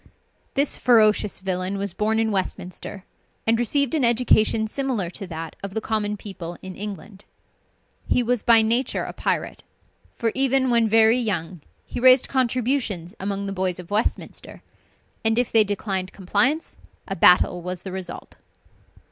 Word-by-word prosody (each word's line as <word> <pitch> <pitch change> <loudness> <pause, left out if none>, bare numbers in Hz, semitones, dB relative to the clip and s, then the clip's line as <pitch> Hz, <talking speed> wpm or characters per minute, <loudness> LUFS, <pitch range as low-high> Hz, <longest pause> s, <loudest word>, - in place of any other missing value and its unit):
This 280 0 +1
ferocious 215 -4 +3
villain 185 +1 -3
was 200 -2 -4
born 215 +3 0
in 225 -1 +1
Westminster, 190 0 -4 0.4
and 225 +1 +2
received 270 +3 +1
an 305 -4 +1
education 225 -2 +3
similar 235 -8 -2
to 195 0 -8
that 165 -2 -7
of 195 0 -7
the - - +1
common 215 -1 -2
people 175 -5 -8
in 190 -1 -8
England. 200 0 -8 0.8
He 250 - +2
was 245 -1 0
by 230 -2 +5
nature 235 +4 +1
a - - -6
pirate; - - -2 0.5
for 230 -2 -1
even 265 -1 +2
when 230 -2 +3
very 225 +2 +5
young 185 -7 -3 0.2
he - - -6
raised 255 +1 +6
contributions 245 -8 -1
among 200 +1 -3
the 195 - -4
boys 185 -2 -1
of 180 +1 -10
Westminster, 215 +2 -2 0.6
and 225 0 +2
if 245 -1 +1
they 225 -1 +6
declined 195 -2 -3
compliance, 215 - 0 0.3
a 195 - -3
battle 180 0 +4
was 180 0 -5
the 190 - -6
result. 190 -1 -7
210 Hz, 155 wpm, -23 LUFS, 190-235 Hz, 0.8 s, raised